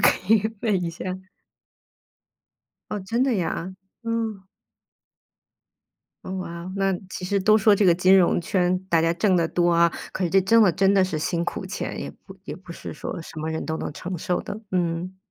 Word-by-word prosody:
可 190 +4 +3
以 215 - +3 0.2
问 200 -6 +1
一 170 - -2
下。 165 - -8 1.9
哦， 210 - -2
真 230 +6 -1
的 265 -3 +2
呀？ 185 0 -2 0.3
嗯。 225 -4 -3 1.8
哦， 185 - -6
哇 170 -2 -6
哦， 185 +1 -7
那 195 0 +2 0.2
其 180 - -6
实 200 +2 +1
都 215 +3 +5
说 215 0 +5
这 200 - +2
个 175 -3 +6
金 185 +2 +5
融 175 -1 +4
圈， 180 +1 +1
大 165 -2 +3
家 165 +1 +2
挣 185 +1 +2
得 170 -1 +2
多 175 0 +2
啊， 170 0 +5 0.2
可 190 - -2
是 170 - -1
这 195 +2 +5
挣 225 +5 +5
得 185 -5 +5
真 195 +4 +3
的 195 -2 +4
是 165 -4 -2
辛 170 +2 -1
苦 190 - -4
钱， 200 - -4
也 - - -5
不 190 - -12
也 - - -6
不 180 -2 -11
是 - - -8
说 155 - -6
什 160 - -10
么 155 +1 -3
人 160 - -3
都 160 0 -2
能 - - -4
承 180 +5 -5
受 180 +1 -1
的， 205 - -6
嗯。 180 0 -1
185 Hz, 215 characters per minute, -24 LUFS, 170-200 Hz, 1.9 s, 个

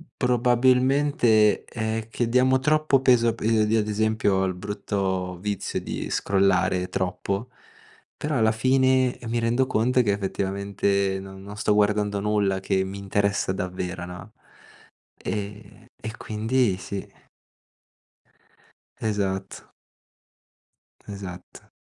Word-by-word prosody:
probabilmente 125 -1 +3
è 110 -1 -3
che 115 0 -1
diamo 130 +2 +4
troppo 150 -1 +2
peso 120 -3 +4
a - - 0
p - - -15
io 110 -1 +3
io 110 +1 +2
ad 105 - -1
esempio 110 -1 +1
ho 95 - +2
il 95 - -1
brutto 95 -2 -3
vizio 100 0 -3
di - - -5
scrollare 95 -2 +1
troppo, 100 +5 -2 0.7
però 150 -3 -2
alla 110 -1 +3
fine 130 +1 +2
mi 115 +1 0
rendo 120 +3 +2
conto 125 +3 +2
che 105 - +1
effettivamente 100 0 -1
non 95 0 -10
non 100 +1 -9
sto 105 - +1
guardando 105 0 +1
nulla 100 -2 +1
che 95 0 0
mi 95 +1 -6
interessa 100 -1 0
davvero, 90 -1 -4
no. 90 +4 -10 0.9
Ehm, 105 +2 -6
e 110 +1 -6
quindi 110 -1 0
sì. 95 +1 -6 1.9
Esatto. 95 -3 -3 1.4
Esatto. 95 -3 -9
105 Hz, 120 wpm, -25 LUFS, 95-120 Hz, 1.9 s, diamo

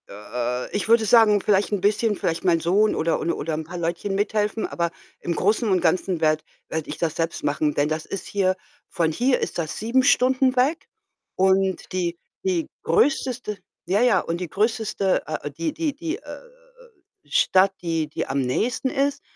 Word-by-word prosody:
Äh, 120 +4 -4
ich 205 - -1
würde 225 0 +4
sagen, 215 -2 +5
vielleicht 200 0 +2
'n 205 -3 -1
bisschen, 210 +2 +2
vielleicht 165 -3 -2
mein 175 -3 +3
Sohn 195 +6 +2
oder 165 +1 0
un 170 - 0
oder 160 +2 -3
'n 155 +1 -2
paar 175 +3 -8
Leutchen 170 +4 -2
mithelfen, 210 +2 0
aber 170 -1 -2 0.3
im 170 - -3
Großen 215 +5 +1
und 185 -2 +2
Ganzen 180 0 +1
werde 155 -1 +2 0.3
werde 160 -1 -3
ich 150 - -5
das 160 -2 -1
selbst 165 0 -2
machen, 150 +1 0
denn 145 +1 +1
das 155 0 -3
ist 195 - -6
hier 190 -2 +1 0.3
von 170 -4 0
hier 250 +10 +1
ist - - -3
das 160 -3 -3
7 235 +5 +2
Stunden 260 -1 +3
weg 275 +6 +1 0.5
und 190 0 +1
die 175 -2 -1 0.3
die 180 -4 0 0.2
größte 245 - +1 0.3
ja, 190 +5 +1
ja, 240 -6 +4
und 170 0 -3
die 180 -2 -4
größte 210 -2 0
äh 155 -1 -4
äh, - - -5
die 160 +3 -3
die 315 -3 -1
die, 330 +3 -4
äh, - - -17
äh, - - -9 0.9
Stadt, 190 +6 +4
die 165 -3 -1
die 150 - -4
am 140 - -1
nächsten 230 - 0
ist, 280 +2 0
190 Hz, 190 wpm, -23 LUFS, 165-220 Hz, 0.9 s, sagen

